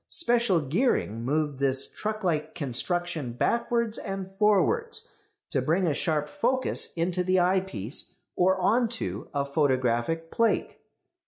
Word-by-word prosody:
Special 235 - +2
gearing 145 - 0
moved 145 +1 -1
this 135 -1 +3
truck 215 0 -5
like 155 -3 -1
construction 160 0 -1
backwards 235 - 0
and 195 -2 -5
forwards 445 - +2 0.4
to 135 - +1
bring 165 +8 +1
a 160 - +1
sharp 150 0 -1
focus 255 - +1
into 175 +2 0
the 185 +1 +2
eyepiece 180 - 0 0.2
or 190 +1 +3
on 225 +6 +2
to 230 -1 -4
a 140 -1 -1
photographic 140 +2 0
plate. 230 -1 0
175 Hz, 130 wpm, -27 LUFS, 145-215 Hz, 0.4 s, this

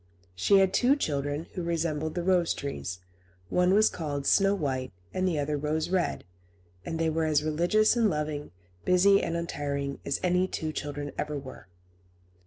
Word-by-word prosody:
She 195 - +4
had 190 -1 +3
two 260 +6 +4
children, 145 - -2
who 180 - -4
resembled 160 -2 -2
the 175 - -2
rose 180 -2 +2
trees. 95 -10 -5 0.5
One 180 - +3
was 215 +1 +6
called 145 -4 -3
Snow 195 +4 +4
White, 130 -7 -2 0.2
and 185 0 0
the 170 -4 0
other 145 +1 -1
Rose 155 +3 -1
Red; 185 -1 0 0.6
and 165 - -4
they 165 0 +1
were 160 0 0
as 150 -1 +2
religious 175 +9 +2
and 230 -3 +3
loving, 150 -3 -3 0.3
busy 195 +2 +5
and 170 - -2
untiring, 140 -4 -3
as 140 - -1
any 180 +1 +2
two 160 -4 -3
children 145 -1 -5
ever 150 -1 -2
were. 130 -8 -10
160 Hz, 170 wpm, -28 LUFS, 145-180 Hz, 0.6 s, was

